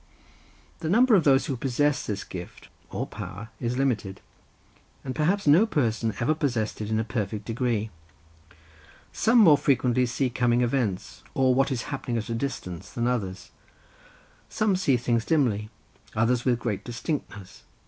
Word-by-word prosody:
The 160 - -3
number 240 +6 +5
of 190 -5 +5
those 135 -1 +4
who 135 - -2
possess 140 +3 0
this 105 -2 -3
gift 90 -1 -9 0.2
or - - -3
power 100 +5 -8
is 120 0 -2
limited, 110 -8 -1 0.9
and 130 - -3
perhaps 175 +8 +1
no 165 +10 +6
person 115 - 0
ever 120 +6 +2
possessed 125 -10 -2
it 105 - -4
in 110 0 +1
a - - +1
perfect 105 -2 -3
degree: 115 -2 -1 1.2
some 230 +2 +3
more 165 -10 +7
frequently 125 -3 +2
see 125 +1 -1
coming 120 -1 +2
events, 120 -6 -1
or 130 -1 +3
what 135 +2 +2
is 125 -3 -2
happening 125 -3 -3
at 110 +1 -4
a - - -1
distance, 100 -8 -4
than 120 +2 -2
others; 100 -7 -2 1.0
some 215 -3 +1
see 145 -9 +2
things 120 -1 0
dimly, 110 -10 +1 0.5
others 115 +2 +1
with 125 -2 +3
great 115 -4 -3
distinctness. 120 - -5
125 Hz, 155 wpm, -26 LUFS, 110-140 Hz, 1.2 s, more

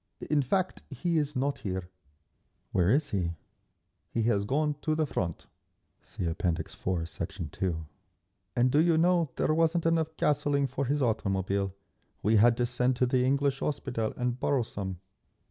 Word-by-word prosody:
"In 150 -1 +4
fact, 185 +8 0
he 170 -2 0
is 145 -1 -2
not 140 +2 0
here…." 95 -3 -3 0.8
"Where 90 0 +3
is 145 +6 +2
he?" 90 -4 0 0.8
"He 115 - -1
has 105 -3 +2
gone 150 +4 0
to 155 -1 0
the 155 0 +1
Front. 90 - -3 0.6
(See - - -6
App. 85 0 -4
IV, 85 0 -1
Sect. 80 -2 -5
2) 80 -3 -2 0.7
And 125 +1 +3
do 145 - +4
you 165 -1 +4
know, 170 -1 +3
there 155 - +1
wasn't 165 +1 +2
enough 160 -1 +1
gasoline 145 -1 +2
for 135 +1 -2
his 140 +2 +1
automobile. 100 -3 0 0.5
We 110 +2 +4
had 115 +2 +5
to 120 - +2
send 125 +1 +1
to 125 - +2
the 125 0 +2
English 140 +1 +2
Hospital 125 -6 -2
and 125 0 -1
borrow 135 -2 +2
some." 95 -4 -5
125 Hz, 165 wpm, -29 LUFS, 100-150 Hz, 0.8 s, had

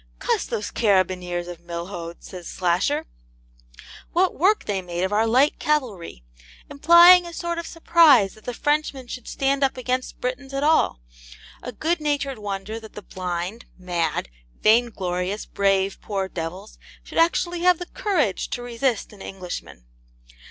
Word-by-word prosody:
'Cuss - - 0
those 210 - -4
carabineers 185 -4 +1
of 175 -2 -8
Milhaud's,' 170 0 -7
says 180 -2 -9
Slasher, 175 -1 0 1.1
'what 365 +2 +2
work 395 +7 +2
they 195 -2 -1
made 175 0 -4
of 190 +2 -1
our 220 +2 +2
light 260 +6 +3
cavalry!' 225 - -2 0.5
implying 345 +4 +7
a - - -8
sort 340 0 -3
of 335 - -6
surprise 320 - +5
that 215 - -19
the 245 - -3
Frenchman 295 -2 -1
should 245 0 -8
stand 275 +1 0
up 270 -1 +1
against 255 0 -3
Britons 265 +2 -4
at 275 - -1
all: 300 - +2 0.6
a 250 - -6
good 320 +9 -1
natured 280 -4 -1
wonder 205 +1 -5
that 220 -1 -13
the 210 - -9
blind, 180 +4 -5
mad, 175 - -2 0.4
vain 235 +3 +5
glorious, 185 0 -3
brave 195 -1 0
poor 195 -2 -3
devils 185 +4 -7 0.2
should - - -4
actually 345 +1 +2
have 360 0 +4
the 355 - -6
courage 320 - -1
to 245 - -4
resist 240 -2 -2
an 200 - -14
Englishman. 130 - -8
220 Hz, 150 wpm, -23 LUFS, 185-285 Hz, 1.1 s, implying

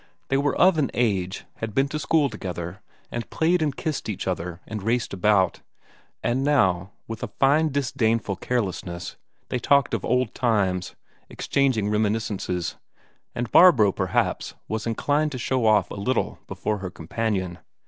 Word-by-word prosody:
They 135 - +2
were 140 0 +1
of 185 -3 +5
an 140 - +1
age, 95 -6 0
had 115 -2 -5
been 135 +1 +3
to 150 - -3
school 150 0 +2
together, 90 -4 -6 0.3
and 120 -1 -4
played 170 +2 +2
and 145 -3 0
kissed 155 -7 -3
each 100 - -4
other 90 -1 -3
and 110 -2 -5
raced 115 +2 0
about; 95 -1 +2 0.6
and 125 +3 +1
now, 95 -10 +2
with 115 -3 -6
a - - -2
fine 150 +4 +3
disdainful 120 -7 0
carelessness, 95 -7 -3 0.3
they 125 - -1
talked 140 0 +3
of 115 - -1
old 125 -1 +1
times 95 -7 0 0.3
exchanging 130 -7 +1
reminiscences 105 -5 -1 0.6
and 120 -1 -3
Barbro, 130 - +7
perhaps, - - -1
was 110 +1 -3
inclined 145 +6 +1
to - - -3
show 125 -1 0
off 105 -1 +3
a 100 - -5
little 125 +3 -1
before 105 -1 -2
her 95 -1 -4
companion. 95 +1 -3
115 Hz, 155 wpm, -24 LUFS, 95-135 Hz, 0.6 s, Barbro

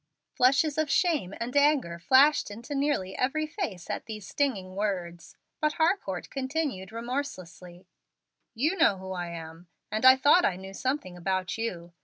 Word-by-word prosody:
Flushes 280 +4 +3
of 310 -2 0
shame 310 - +1
and 240 +3 -4
anger 285 - +2
flashed 270 - +4
into 235 +7 -8
nearly 275 -10 -1
every 310 +5 0
face 305 - -5
at - - -5
these 215 -3 -7
stinging 195 -10 -2
words, 180 -5 -4 0.2
but 305 -1 +1
Harcourt 320 - -1
continued 265 -8 -3
remorselessly: 205 -8 -6 0.7
"You 305 +11 +1
know 265 - +4
who 190 0 -8
I 175 -2 -4
am, 165 0 -9 0.2
and 215 +2 -2
I 260 0 +9
thought 285 +7 +5
I 185 - +2
knew 190 +1 -9
something 260 -4 -3
about 185 +1 -2
you. 175 -7 -5
230 Hz, 155 wpm, -28 LUFS, 185-285 Hz, 0.7 s, I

